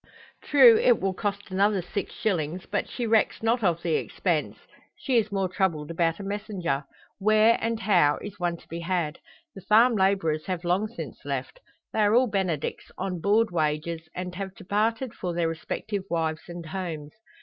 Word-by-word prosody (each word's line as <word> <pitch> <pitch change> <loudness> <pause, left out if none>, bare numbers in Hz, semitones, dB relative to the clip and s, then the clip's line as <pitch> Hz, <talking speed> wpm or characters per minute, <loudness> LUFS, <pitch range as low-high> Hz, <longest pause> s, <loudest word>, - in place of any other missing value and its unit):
True, 255 -6 +7
it 240 -3 +4
will 190 0 0
cost 200 +1 -4
another 195 0 +2
six 200 +3 -4
shillings, 180 -4 -2
but 205 - -2
she 245 - -3
recks 225 -1 +2
not 230 +1 +2
of 170 -3 +1
the 165 - 0
expense. - - -1 0.4
She 265 - -1
is 215 -2 +1
more 195 -1 0
troubled 170 -5 -1
about 165 +1 0
a - - -6
messenger. 195 -8 -3 0.3
Where, 215 +3 +5
and 230 0 -1
how, 175 -8 +4
is 205 -2 -9
one 175 -1 -1
to - - -20
be 165 - -6
had? 170 -2 -2 0.3
The 195 - -10
farm 230 +5 +5
labourers 190 -6 +1
have 185 -2 -3
long 180 +5 +1
since 235 - -8
left. - - -4 0.3
They - - -1
are 210 +1 +4
all 255 +2 +5
Benedicts, 190 - -2
on 185 -2 -3
board 215 +3 +3
wages, 160 0 -1
and 180 0 -4
have 190 0 -6
departed 225 +5 -1
for 175 -2 -4
their 170 -1 +1
respective 190 +5 -4
wives 160 -1 -2
and 175 -1 -7
homes. 160 -3 -5
190 Hz, 180 wpm, -26 LUFS, 170-215 Hz, 0.4 s, True